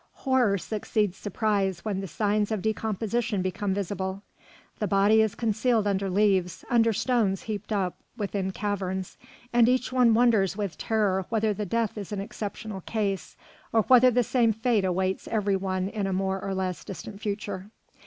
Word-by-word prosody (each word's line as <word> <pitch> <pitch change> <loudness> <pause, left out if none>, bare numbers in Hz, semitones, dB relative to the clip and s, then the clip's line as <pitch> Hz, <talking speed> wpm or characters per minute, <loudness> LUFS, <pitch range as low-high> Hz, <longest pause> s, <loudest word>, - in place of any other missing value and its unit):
Horror 250 -7 +3
succeeds 210 -1 -1
surprise 200 -3 -1
when 205 -3 -1
the 195 - -5
signs 210 +4 0
of 210 -4 -2
decomposition 220 -1 -1
become 185 +2 -2
visible. 195 0 -3 0.6
The 210 - 0
body 200 +2 +4
is 220 -2 +1
concealed 225 0 +1
under 195 -1 0
leaves, 190 -2 +1
under 230 -1 +4
stones 215 -4 +1
heaped 215 -1 -5
up 190 -4 0 0.2
within 200 -3 -2
caverns, 190 -2 -3 0.3
and 240 0 +5
each 255 0 +1
one 245 -3 +5
wonders 220 -5 +3
with 200 -5 -3
terror 200 -4 0
whether 220 -1 +1
that 205 -1 -4
death 230 -1 0
is 200 - -7
an 205 - -2
exceptional 205 0 -6
case, 200 -6 -2 0.3
or 225 -1 +3
whether 255 +1 +7
the 245 0 +2
same 230 -1 +2
fate 225 -2 +1
awaits 185 +1 -1
every 205 -3 +1
one 185 -1 -1
in 200 -1 -2
a 195 - -1
more 190 0 -1
or 195 -1 -2
less 185 -4 -2
distant 200 +2 -8
future. 200 -2 -4
205 Hz, 165 wpm, -27 LUFS, 190-220 Hz, 0.6 s, whether